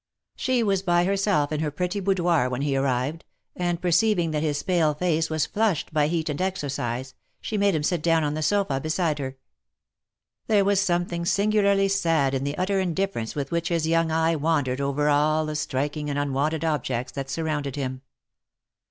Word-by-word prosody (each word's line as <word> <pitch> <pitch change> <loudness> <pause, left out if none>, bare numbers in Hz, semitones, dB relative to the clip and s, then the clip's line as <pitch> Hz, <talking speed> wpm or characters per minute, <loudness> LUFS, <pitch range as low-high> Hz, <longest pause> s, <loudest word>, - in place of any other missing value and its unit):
She 255 -2 +1
was 195 -3 +1
by 175 -2 +2
herself 195 -6 +1
in 155 - -1
her 155 -1 0
pretty 180 +6 -2
boudoir 175 -8 +1
when 125 +2 -2
he 140 -2 0
arrived, 135 +4 -1 0.3
and 175 -1 -1
per 180 - -1
ceiving 180 -4 +3
that 150 -1 -1
his 145 -2 -1
pale 165 -6 +2
face 160 0 0
was 155 -1 0
flushed 205 -8 -1
by 150 -1 +3
heat 165 0 -1
and 150 +2 -2
exercise, 130 -8 -3 0.3
she 220 - -5
made 200 -3 +2
him 150 - -1
sit 175 0 0
down 165 0 +2
on 145 0 -1
the 155 - -3
sofa, 175 -5 +1
beside 155 0 -1
her. 135 -1 -5 1.1
There 205 -3 +3
was 200 -1 +3
something 175 -2 0
singularly 200 +1 +2
sad 165 -8 +1
in 135 0 -1
the 145 +1 -3
utter 190 +2 0
indifference 185 -9 -2
with 140 -2 -3
which 170 0 -1
his 165 -2 0
young 165 0 +2
eye 160 +1 +2
wandered 145 -4 0
over 140 +1 0
all 155 +2 +2
the 155 0 -4
striking 150 +1 -2
and 145 - -2
unwonted 145 +3 -1
ob 155 -2 0
jects 125 -1 -3
that 135 -1 -5
surrounded 150 -3 -2
him. 130 -2 -4
160 Hz, 190 wpm, -25 LUFS, 145-180 Hz, 1.1 s, ceiving